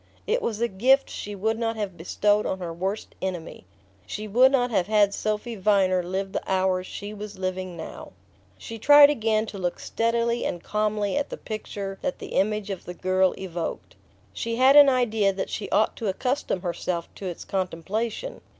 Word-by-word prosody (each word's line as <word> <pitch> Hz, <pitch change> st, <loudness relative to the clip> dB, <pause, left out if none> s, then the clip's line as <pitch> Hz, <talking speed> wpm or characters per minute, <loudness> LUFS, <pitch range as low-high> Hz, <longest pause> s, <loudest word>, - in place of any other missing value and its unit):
It 480 Hz, +3 st, +1 dB
was 220 Hz, -2 st, -2 dB
a 235 Hz, -, +3 dB
gift 255 Hz, +7 st, +3 dB
she 205 Hz, 0 st, -6 dB
would 220 Hz, +3 st, -1 dB
not 230 Hz, -1 st, -1 dB
have 205 Hz, -4 st, -4 dB
bestowed 205 Hz, +5 st, +1 dB
on 190 Hz, -, -2 dB
her 175 Hz, -3 st, -5 dB
worst 190 Hz, +5 st, -4 dB
enemy. 180 Hz, -, -5 dB, 0.4 s
She 215 Hz, +1 st, -5 dB
would 250 Hz, +6 st, +5 dB
not 250 Hz, -3 st, +2 dB
have 185 Hz, -5 st, +1 dB
had 210 Hz, -2 st, +3 dB
Sophy 215 Hz, +3 st, -2 dB
Viner 190 Hz, -2 st, +3 dB
live 190 Hz, +2 st, -3 dB
the -, -, -2 dB
hours 185 Hz, -1 st, +1 dB
she 205 Hz, +1 st, -7 dB
was 210 Hz, -1 st, -8 dB
living 185 Hz, -1 st, -4 dB
now... 160 Hz, -, -9 dB, 0.4 s
She 225 Hz, 0 st, -8 dB
tried 290 Hz, +4 st, +8 dB
again 220 Hz, -5 st, +1 dB
to 205 Hz, -2 st, -8 dB
look 175 Hz, -1 st, -2 dB
steadily 235 Hz, +1 st, 0 dB
and 175 Hz, -, -3 dB
calmly 210 Hz, +1 st, 0 dB
at 290 Hz, -, -1 dB
the -, -, -6 dB
picture 200 Hz, -2 st, -6 dB
that 275 Hz, -, -2 dB
the -, -, -8 dB
image 210 Hz, +1 st, 0 dB
of 190 Hz, -, -6 dB
the 180 Hz, -, -7 dB
girl 185 Hz, 0 st, +2 dB
evoked. 175 Hz, -3 st, -5 dB, 0.4 s
She 230 Hz, 0 st, -3 dB
had 260 Hz, +3 st, +5 dB
an 290 Hz, -1 st, +9 dB
idea 225 Hz, -6 st, +2 dB
that 190 Hz, -, -4 dB
she 205 Hz, -, -4 dB
ought 215 Hz, -, +2 dB
to 225 Hz, -, -3 dB
accustom 250 Hz, 0 st, -1 dB
herself 175 Hz, -1 st, -2 dB
to 195 Hz, -, -7 dB
its 175 Hz, -, -6 dB
contemplation. 200 Hz, -, -3 dB
205 Hz, 185 wpm, -25 LUFS, 185-230 Hz, 0.4 s, an